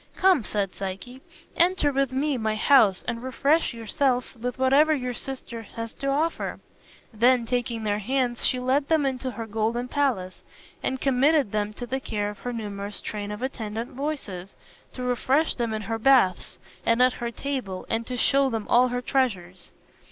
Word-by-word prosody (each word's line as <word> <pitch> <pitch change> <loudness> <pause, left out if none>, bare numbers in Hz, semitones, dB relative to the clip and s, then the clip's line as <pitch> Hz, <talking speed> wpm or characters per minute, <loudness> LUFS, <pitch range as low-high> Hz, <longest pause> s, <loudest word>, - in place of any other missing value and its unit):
"Come," 370 -9 +4
said 200 -3 -1
Psyche, 195 +7 -6 0.3
"enter 345 -4 +3
with 275 -1 0
me 280 +2 0
my 220 -3 -1
house 215 -5 +4
and 230 - -2
refresh 280 +5 +1
yourselves 245 +3 -1
with 245 +2 -4
whatever 280 +4 +4
your 250 -3 -3
sister 240 -2 -6
has 230 +1 -7
to 275 - -5
offer." 300 +4 -1 0.5
Then 240 +2 +4
taking 235 -1 -2
their 205 -1 0
hands 245 +2 -1
she 255 - +2
led 265 +3 +1
them 315 -3 +3
into 260 -1 -2
her 230 -2 -5
golden 225 +3 -1
palace, 245 -10 -1 0.4
and 260 - -2
committed 275 -1 +3
them 210 0 -1
to 245 - -6
the 265 +2 -2
care 205 -5 -2
of 210 - -13
her 245 - -4
numerous 205 -3 -5
train 205 -1 -5
of 210 +4 -6
attendant 225 -3 -4
voices, 245 -10 -5 0.4
to 255 - -6
refresh 260 +5 +1
them 235 -2 -2
in 215 -1 -3
her 225 +2 -3
baths 235 -8 +3 0.3
and 230 +1 +2
at 250 -1 +5
her 235 - -1
table, 235 -7 -4
and 225 +1 -2
to 250 - -3
show 275 +2 +3
them 225 -3 -3
all 245 +1 +5
her 245 0 -3
treasures. 185 -11 -1
245 Hz, 175 wpm, -25 LUFS, 215-270 Hz, 0.5 s, at